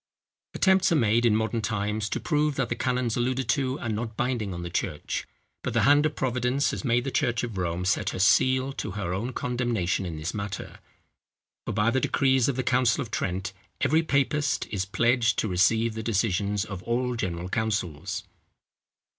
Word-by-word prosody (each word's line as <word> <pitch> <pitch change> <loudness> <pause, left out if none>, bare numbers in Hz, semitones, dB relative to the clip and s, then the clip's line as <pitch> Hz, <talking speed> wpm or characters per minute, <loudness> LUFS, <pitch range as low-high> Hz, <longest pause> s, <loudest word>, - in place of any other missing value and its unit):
Attempts 190 -2 +4
are - - +4
made 115 -3 +3
in 110 - +3
modern 110 +1 0
times 105 0 -2
to - - -2
prove 150 -2 +1
that 130 -3 -1
the 115 - -1
canons 125 -2 0
alluded 130 +2 -1
to 135 -1 +1
are - - -4
not 110 0 -3
binding 120 -5 -1
on 85 -1 -5
the 85 - -4
church; 75 -3 -3 0.3
but - - -4
the - - +3
hand 145 +2 +5
of 150 - -6
Providence 125 +1 0
has - - -5
made 120 -2 +2
the 135 - -3
church 120 -1 0
of 115 -4 -4
Rome 90 -1 -2
set 95 - +1
her - - -5
seal 130 +7 +3
to 105 - -4
her 95 -4 -3
own 110 +7 -2
condemnation 120 -8 -1
in 80 -2 -5
this 80 +2 -4
matter; 100 -2 -5 0.9
for - - -1
by 105 +3 +2
the 130 +2 +1
decrees 130 -2 +2
of 135 - -1
the 130 - -1
council 125 -2 +2
of 115 - -12
Trent 95 -1 -2 0.3
every 160 +2 +3
papist 145 -1 +1
is 95 -3 -1
pledged 115 +3 +2
to - - +1
receive 110 +5 +2
the 110 - -4
decisions 105 -2 0
of 95 -3 -7
all 125 +3 -1
general 90 -5 -3
councils. 95 -7 -2
115 Hz, 190 wpm, -26 LUFS, 100-130 Hz, 0.9 s, hand